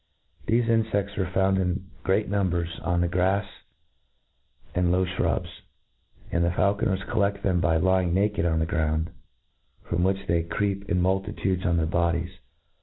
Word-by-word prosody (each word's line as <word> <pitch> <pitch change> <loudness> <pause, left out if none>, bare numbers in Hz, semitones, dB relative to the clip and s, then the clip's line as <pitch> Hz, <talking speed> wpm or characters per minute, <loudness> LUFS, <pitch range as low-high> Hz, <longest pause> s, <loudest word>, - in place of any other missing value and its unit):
Thefe 115 +2 +3
infeds 110 -3 0
are 95 -2 0
found 95 0 +2
in 95 +1 -1 0.2
great 100 +3 +1
numbers 90 -4 -1
on 85 0 0
the 90 - +2
grafs 95 +3 +1 1.2
and 90 -1 +2
low 95 +1 +2
fhrubs; 90 - -2 0.7
and 85 - +1
the 85 - +2
faulconers 95 +1 +1
colled 100 -1 0
them 90 -3 +2
by 85 -2 +2
lying 95 +1 +2
•naked* 95 -2 +1
on 80 - +1
the 80 - +1
ground, 80 0 -1 0.7
from 85 0 -2
which 95 +2 0
they 85 0 +1
creep 100 +3 -2
in 90 - +2
multitudes 95 0 0
on 85 -1 +2
their 80 - +1
bo 85 +1 +1
dies. 85 +1 -3
95 Hz, 160 wpm, -26 LUFS, 85-100 Hz, 1.2 s, Thefe